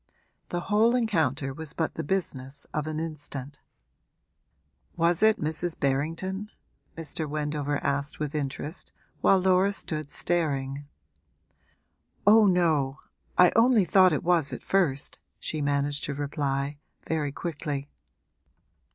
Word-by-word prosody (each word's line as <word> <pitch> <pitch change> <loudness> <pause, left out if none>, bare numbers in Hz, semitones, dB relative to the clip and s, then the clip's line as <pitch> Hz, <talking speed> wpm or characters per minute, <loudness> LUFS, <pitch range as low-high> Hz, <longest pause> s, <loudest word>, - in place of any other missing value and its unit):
The 175 - -2
whole 215 +5 +3
encounter 155 - 0
was 160 +1 -7
but 160 -1 -1
the - - -4
business 140 -6 -3
of 155 0 -2
an 155 0 -3
instant. 145 -3 -6 1.4
'Was 170 0 +2
it 220 0 +5
Mrs. 160 +2 -1
Berrington?' 165 +9 -1 0.5
Mr. 160 -1 -3
Wendover 150 -1 -1
asked 140 +1 -1
with 150 -1 -3
interest 150 +3 -4 0.3
while 195 - +5
Laura 190 +1 +3
stood 155 -6 -4
staring. 140 -5 -1 1.4
'Oh 215 +1 +7
no, 155 -7 +2 0.4
I 180 -1 +7
only 230 -3 +5
thought 185 +1 +6
it 150 - -1
was 170 -4 +3
at - - -6
first,' 165 -8 0 0.2
she 155 - -3
managed 145 0 0
to 140 - -3
reply, 140 0 -2 0.3
very 155 -3 -1
quickly. 145 -3 -4
155 Hz, 120 wpm, -27 LUFS, 140-180 Hz, 1.4 s, Oh